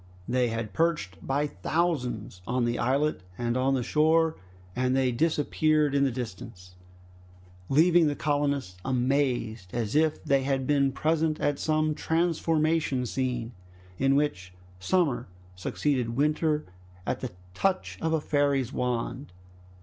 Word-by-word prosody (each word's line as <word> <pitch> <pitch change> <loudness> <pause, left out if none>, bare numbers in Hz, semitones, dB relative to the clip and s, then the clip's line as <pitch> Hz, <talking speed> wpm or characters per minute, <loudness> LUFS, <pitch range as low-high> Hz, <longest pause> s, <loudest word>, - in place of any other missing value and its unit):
They 125 0 +2
had 115 -2 -4
perched 165 - 0
by 140 +2 0
thousands 125 - -2
on 125 0 +1
the 120 0 -1
islet 140 +1 +1 0.2
and 120 0 -1
on 130 +1 +2
the 125 - -1
shore, 160 +3 +3 0.4
and 130 +1 +1
they 130 -1 +2
disappeared 155 +1 +1
in 140 0 +3
the - - +2
distance, 95 -6 -7 1.0
leaving 165 +3 +5
the 145 - 0
colonists 140 -9 -1
amazed 125 -6 0
as 115 0 -2
if 155 0 +2
they 140 -1 +2
had 135 -1 -1
been 140 -1 +2
present 155 +2 0
at 145 -1 0
some 155 0 +1
transformation 160 -4 +1
scene, 125 -2 -2 0.5
in 135 +1 +3
which 90 -12 -1 0.3
summer 130 - +1 0.3
succeeded 120 +5 -1
winter 150 +1 +1 0.4
at - - -1
the 130 - -4 0.2
touch 190 - -1
of 160 - 0
a 160 - +2
fairy's 140 -4 +1
wand. 125 +1 -2
140 Hz, 135 wpm, -27 LUFS, 120-155 Hz, 1.0 s, leaving